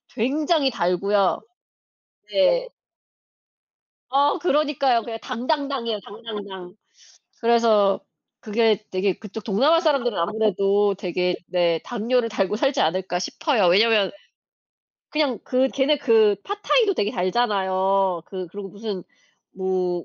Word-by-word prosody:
굉장히 280 +3 +1
달고요. 195 +1 +1 0.9
네. - - +2 1.4
어 285 +6 +2
그러니까요. 280 -7 +1
그냥 225 0 -6
당당당이에요, 255 -3 -2
당당당. 200 -4 -9 0.7
그래서 230 -4 +3 0.4
그게 215 -1 +1
되게 185 +1 0
그쪽 210 0 -9
동남아 275 +11 +3
사람들은 275 - +1
아무래도 200 +1 +1
되게 180 0 -1
네 170 -2 +1
'당뇨를 240 +1 0
달고 205 -1 -1
살지 275 +3 0
않을까?' 180 +2 0
싶어요. 210 - 0
왜냐면 210 +1 +4 1.0
그냥 290 -7 0
그 260 +1 +1
걔네 280 +2 +1
그 220 -4 +4
팟타이도 410 0 +1
되게 205 -5 0
달잖아요. 190 -3 0
그 185 -2 -6
그리고 200 +2 -8
무슨 200 -2 -6 0.5
뭐 185 -2 -2
215 Hz, 255 characters per minute, -23 LUFS, 190-260 Hz, 1.4 s, 왜냐면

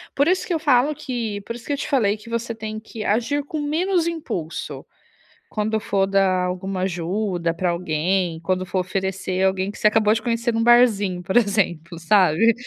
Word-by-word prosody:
Por 285 +3 +3
isso 370 +1 +2
que 355 - -2
eu 320 - 0
falo 285 -1 +3
que 235 -8 -4
por 230 +4 -6
isso 240 - -11
que 290 - -2
eu - - -1
te - - -4
falei 220 -7 +2
que 215 +2 -13
você 235 0 -2
tem 215 -1 -6
que 220 0 -8
agir 245 +7 0
com 305 +2 -5
menos 335 +4 0
impulso. 185 - -5 0.6
Quando 220 +1 -1
for 195 -2 +1
dar 195 -2 +2
alguma 185 +1 -3
ajuda 180 -1 -1
pra 180 +1 -1
alguém, 170 +1 -1
quando 185 +2 -1
for 185 - -2
oferecer 190 0 -2
alguém 190 +1 +1
que - - -12
você 210 - +4
acabou 215 0 +3
de 225 - -1
conhecer 235 0 -1
num 225 0 +1
barzinho, 210 -7 +4
por 190 - -3
exemplo, 190 -6 0
sabe? 185 +4 +4
210 Hz, 195 wpm, -22 LUFS, 185-235 Hz, 0.6 s, você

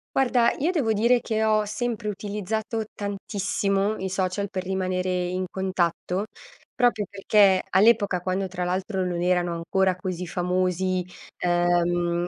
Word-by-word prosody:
Guarda, 245 -3 +3
io 315 +6 +1
devo 280 -11 +1
dire 235 +3 +3
che 220 -1 -1
ho 215 -1 +3
sempre 215 +1 -3
utilizzato 210 +2 -3
tantissimo 200 0 -1
i 190 - -3
social 190 +1 -1
per 185 -1 -4
rimanere 185 -1 -1 0.2
in 185 +1 -2
contatto, 185 0 -1 0.5
proprio 240 -4 +2
perché 200 -1 +3
all'epoca, 200 -1 +4
quando 185 +2 -1
tra 180 -1 -4
l'altro 185 +2 -1
non 175 -1 -2
erano 175 -1 +1
ancora 185 +3 +1
così 180 -1 -4
famosi, 180 +1 0 0.3
ehm, 175 0 +1
190 Hz, 130 wpm, -25 LUFS, 180-210 Hz, 0.5 s, all'epoca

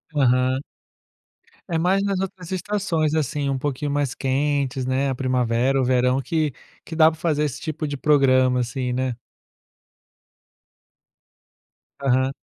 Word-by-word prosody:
Aham. 130 -1 +2 1.1
É 165 - 0
mais 185 +4 +2
nas 200 -1 0
outras 185 -3 -6
estações, 185 -5 -1
assim, 145 -2 -1
um 135 - 0
pouquinho 145 +1 -2
mais 145 -2 -1
quentes, 135 -1 0
né, 135 +2 0
a 130 - -1
primavera, 130 0 +1
o - - +1
verão 125 +1 +2
que 155 0 -1 0.3
que 160 - -7
dá 160 0 +6
para 160 - -12
fazer 150 -3 +1
esse 145 -1 -3
tipo 155 -1 -4
de 145 -1 -4
programa 130 -3 +3
assim, 125 +1 -3
né. 130 -2 -2 2.8
Aham. 130 0 +2
140 Hz, 135 wpm, -23 LUFS, 130-155 Hz, 2.8 s, dá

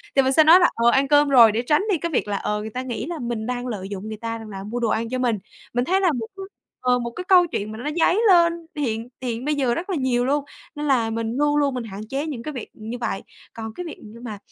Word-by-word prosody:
thì 275 - +6
mình 265 0 +1
sẽ 315 - +7
nói 325 +4 +8
là 355 - +5
"Ờ, 235 +1 +4
ăn 270 +3 +3
cơm 290 0 +4
rồi." 240 -5 +8
để 225 +3 0
tránh 300 +7 +2
đi 360 - +2
cái 335 +2 -3
việc 255 - 0
là, 205 -1 -1
ờ, 210 +1 -2
người 220 - -5
ta 250 +4 -4
nghĩ 250 -2 -4
là 335 0 -5
mình 235 -2 -3
đang 250 +1 -3
lợi 200 -5 -4
dụng 200 +1 -6
người 215 0 -6
ta 230 +1 -4
rằng 220 -1 -10
là 195 -1 -7
mua 225 +4 -4
đồ 235 -2 0
ăn 225 +1 -1
cho 255 - -2
mình. 240 -4 +1 0.4
Mình 245 +1 +1
thấy 380 +2 +2
là 360 -4 +4
một 235 -5 -3
cái 390 - -6 0.4
ờ, 250 0 +3
một 235 0 -4
cái 360 - -6
câu 360 -2 +5
chuyện 210 -7 -4
mà 220 - -7
nó 260 +6 -4
dấy 380 +6 +3
lên 340 -3 +6 0.2
hiện 235 -5 -2
hiện 240 -1 -3
bây 300 0 +1
giờ 260 -4 +1
rất 355 +8 -4
là 380 - 0
nhiều 255 -4 +1
luôn. 285 +2 0 0.3
Nên 295 0 -4
là 240 -5 +2
mình 225 +2 -3
luôn 295 0 +2
luôn 285 -2 +2
mình 250 - -3
hạn 205 -2 -8
chế 275 +3 -2
những 275 -7 -5
cái 305 - -4
việc 250 -5 -7
như 225 +3 -7
vậy. 215 -5 -3 0.3
Còn 220 -1 -7
cái 360 - -6
việc 325 - -7
như 220 +2 -12
mà, 215 -4 -6
245 Hz, 300 wpm, -23 LUFS, 225-295 Hz, 0.4 s, nói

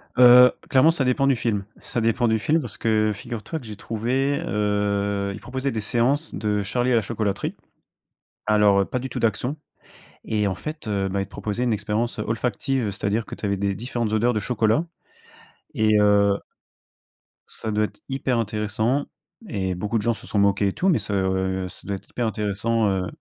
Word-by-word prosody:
Heu, 125 0 +9 0.2
clairement 135 +5 +5
ça 155 -5 -1
dépend 125 +2 +2
du 135 - +4
film. 110 -4 -1 0.2
Ça 120 - -3
dépend 115 +2 +2
du 110 -1 +2
film 160 +8 +2
parce 120 -7 -6
que 110 -1 +2
figure 115 +1 -7
toi 160 - -4
que 130 - -13
j'ai 105 -1 -7
trouvé, 130 +7 -1
heu 100 -3 0
ils 105 - -8
proposaient 130 +2 -3
des 110 - -2
séances 130 +9 +1
de 105 -1 -1
Charlie 120 +5 0
et 120 - +4
la 115 - +4
chocolaterie. 105 -3 -2 0.9
Alors 105 -2 +4
heu, - - +2
pas 125 - -3
du 130 +1 -5
tout 120 - -5
d'action 120 +6 0 0.7
et 105 -2 0
en 95 - -1
fait, 155 -4 -7
heu, 100 -2 0
bah, 100 +1 -1
ils - - -2
te - - -23
proposaient 110 +4 -3
une 120 - +1
expérience, 105 +3 -2
heu, - - -1
olfactive. 120 +1 -1
C'est-à-dire 105 +2 -1
que - - -7
tu - - -6
avais 100 0 0
des 100 0 -1
différentes 115 0 -3
odeurs 120 +3 +2
de 110 - 0
chocolat, 110 +7 +1 0.9
et 110 -1 +3
heu 100 -1 +4 1.1
ça 110 - -4
doit 105 0 +2
être - - -11
hyper 130 -2 0
intéressant 110 +4 0 0.4
et 95 - -2
beaucoup 105 +5 -1
de 105 - -2
gens 115 - +2
se - - -12
sont 105 - 0
moqués 100 0 +3
et - - -5
tout, 190 - +1
mais 165 - +3
ça, 105 0 -4
heu, 95 -1 0
ça - - -14
doit 100 - -1
être - - -12
hyper 120 -2 -2
intéressant, 110 +1 0
heu 95 -1 -1
110 Hz, 205 wpm, -24 LUFS, 100-120 Hz, 1.1 s, Heu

